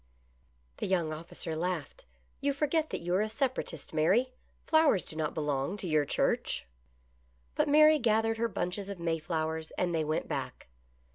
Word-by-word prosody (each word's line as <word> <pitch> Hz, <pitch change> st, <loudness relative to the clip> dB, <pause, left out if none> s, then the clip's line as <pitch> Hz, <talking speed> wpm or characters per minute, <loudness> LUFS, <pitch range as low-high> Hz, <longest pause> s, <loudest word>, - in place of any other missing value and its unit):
The -, -, -2 dB
young 170 Hz, -5 st, +1 dB
officer 160 Hz, 0 st, -5 dB
laughed. 170 Hz, -2 st, -3 dB, 0.2 s
" 65 Hz, -, -37 dB
You 280 Hz, 0 st, +1 dB
forget 305 Hz, +2 st, 0 dB
that -, -, -4 dB
you 175 Hz, +1 st, -2 dB
are 190 Hz, -, +3 dB
a 215 Hz, -, 0 dB
Separatist, 240 Hz, -, -3 dB
Mary. 195 Hz, +12 st, +3 dB, 0.3 s
Flowers 315 Hz, -, +4 dB
do -, -, -9 dB
not 155 Hz, -1 st, -2 dB
belong 150 Hz, +4 st, -1 dB
to 200 Hz, -, -5 dB
your 155 Hz, -2 st, +2 dB
church." -, -, 0 dB, 0.9 s
But -, -, +1 dB
Mary 305 Hz, +1 st, +7 dB
gathered 225 Hz, -1 st, +2 dB
her 235 Hz, -, +2 dB
bunches 195 Hz, -1 st, -3 dB
of 200 Hz, -3 st, -6 dB
Mayflowers 160 Hz, -1 st, -2 dB
and 175 Hz, -1 st, 0 dB
they 160 Hz, -1 st, +1 dB
went 155 Hz, +1 st, -1 dB
back. -, -, -5 dB
180 Hz, 165 wpm, -30 LUFS, 160-230 Hz, 0.9 s, Mary